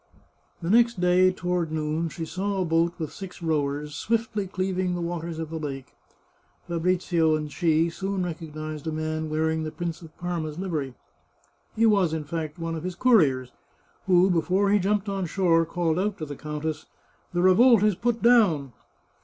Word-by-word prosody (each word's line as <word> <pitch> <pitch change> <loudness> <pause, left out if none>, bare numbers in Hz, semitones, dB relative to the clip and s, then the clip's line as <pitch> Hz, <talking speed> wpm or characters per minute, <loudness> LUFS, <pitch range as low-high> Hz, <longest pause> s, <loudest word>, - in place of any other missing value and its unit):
The 165 - -2
next 235 -2 +4
day, 180 +1 +4
toward 180 -3 -2
noon, 155 +1 -1
she 165 0 -5
saw 195 +4 -2
a 185 - +1
boat 165 +1 +2
with 160 -3 -5
six 190 -2 -9
rowers 150 -3 -1
swiftly 220 +3 -1
cleaving 185 -1 -1
the - - -3
waters 170 -1 -4
of 160 -1 -5
the 165 - -4
lake. 135 -3 -6 0.7
Fabrizio 170 -2 +1
and 150 -1 -4
she 165 0 +2
soon 190 +1 -2
recognised 155 -2 -6
a - - -1
man 155 0 -3
wearing 160 +1 0
the 155 - -3
Prince 170 +1 -5
of 160 -2 -14
Parma's 165 -4 -4
livery. 155 -9 -3 0.8
He 230 - +3
was, 200 -7 +3
in 155 - -3
fact, 155 +1 -5
one 165 -1 -4
of 160 - -4
his 180 -1 -4
couriers, 150 - +3 0.6
who, 185 0 +5
before 185 +4 +2
he 205 - +4
jumped 205 +2 0
on 195 -2 -2
shore, 165 -2 +2
called 170 -1 0
out 205 +1 -1
to 160 - -5
the 145 - -6
duchess: 150 +2 -5 0.2
" - - -37
The 175 - +2
revolt 215 +4 +6
is 210 -1 +4
put 230 +4 -1
down." 185 - +4
170 Hz, 180 wpm, -26 LUFS, 155-190 Hz, 0.8 s, revolt